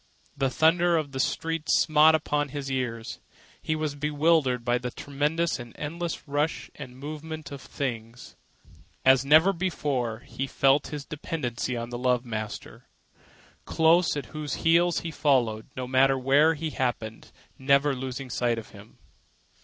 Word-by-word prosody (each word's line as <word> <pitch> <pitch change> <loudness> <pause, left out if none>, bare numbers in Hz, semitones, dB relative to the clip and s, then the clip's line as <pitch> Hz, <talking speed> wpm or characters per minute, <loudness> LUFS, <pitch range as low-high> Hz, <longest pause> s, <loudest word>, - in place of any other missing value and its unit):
The 135 -1 0
thunder 170 +4 +3
of 150 -3 -3
the 135 - -5
streets 165 +4 0
smote 155 0 +5
upon 145 -2 -1
his 135 0 -5
ears. 120 -3 -3 0.4
He 155 - -1
was 155 -2 -2
bewildered 145 -4 +1
by 120 0 +2
the 125 0 -4
tremendous 150 +5 -1
and 120 -1 -10
endless 165 +3 -5
rush 145 +3 -2
and 130 -4 -10
movement 155 +2 -7
of 140 -1 -8
things. 120 -4 -6 0.7
As 130 0 +6
never 155 +7 +5
before, 140 - -2
he 135 +2 -5
felt 135 +2 +2
his 145 -2 -6
dependence 145 -6 -4
on 120 -1 -4
the 120 - -4
love 125 -1 +1
master, 110 -2 -6 0.8
close 165 0 +3
at 145 - -4
whose 150 -2 -4
heels 170 +1 +3
he 165 - -5
followed, 125 -8 +1
no 130 - -3
matter 135 +1 +3
what 145 +5 +3 0.2
happened 115 -4 -3 0.3
never 140 +1 +3
losing 130 0 -6
sight 120 -1 0
of 115 - -8
him. - - -15
140 Hz, 145 wpm, -26 LUFS, 125-155 Hz, 0.8 s, As